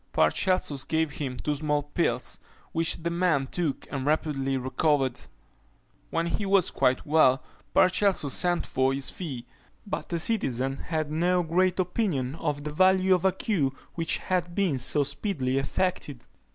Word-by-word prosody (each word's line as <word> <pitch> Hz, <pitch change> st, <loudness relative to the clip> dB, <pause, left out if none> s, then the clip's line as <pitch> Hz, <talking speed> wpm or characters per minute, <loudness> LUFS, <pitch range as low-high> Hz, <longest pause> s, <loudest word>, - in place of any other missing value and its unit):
Paracelsus 140 Hz, -, +1 dB
gave 160 Hz, -1 st, 0 dB
him 135 Hz, -3 st, -4 dB
two 150 Hz, -, -1 dB
small 150 Hz, 0 st, 0 dB
pills, 145 Hz, -4 st, -2 dB, 0.3 s
which 165 Hz, 0 st, 0 dB
the 170 Hz, -, -1 dB
man 170 Hz, -6 st, +2 dB
took, 155 Hz, 0 st, -3 dB
and 135 Hz, -2 st, -3 dB
rapidly 140 Hz, -2 st, 0 dB
recovered. 130 Hz, 0 st, 0 dB, 0.9 s
When 165 Hz, 0 st, 0 dB
he 170 Hz, +5 st, -2 dB
was 195 Hz, -2 st, +3 dB
quite 130 Hz, 0 st, +1 dB
well, 140 Hz, -4 st, +4 dB, 0.3 s
Paracelsus 185 Hz, -6 st, +3 dB
sent 175 Hz, -1 st, +1 dB
for 130 Hz, +1 st, +1 dB
his 135 Hz, 0 st, -2 dB
fee; 135 Hz, -9 st, -6 dB, 0.4 s
but 200 Hz, -, -4 dB
the 170 Hz, -, -1 dB
citizen 135 Hz, -, -1 dB
had 155 Hz, -2 st, -3 dB
no 175 Hz, +3 st, +2 dB
great 180 Hz, +3 st, +1 dB
opinion 180 Hz, -, 0 dB
of 150 Hz, -2 st, -3 dB
the 150 Hz, -, -4 dB
value 185 Hz, +2 st, +4 dB
of 180 Hz, 0 st, +1 dB
a 190 Hz, -, +5 dB
cure 180 Hz, -8 st, 0 dB, 0.2 s
which 165 Hz, -1 st, 0 dB
had 175 Hz, -2 st, -2 dB
been 185 Hz, -10 st, +1 dB
so 145 Hz, +4 st, +2 dB
speedily 140 Hz, -3 st, -1 dB
effected. 145 Hz, -4 st, -2 dB
155 Hz, 150 wpm, -27 LUFS, 135-180 Hz, 0.9 s, a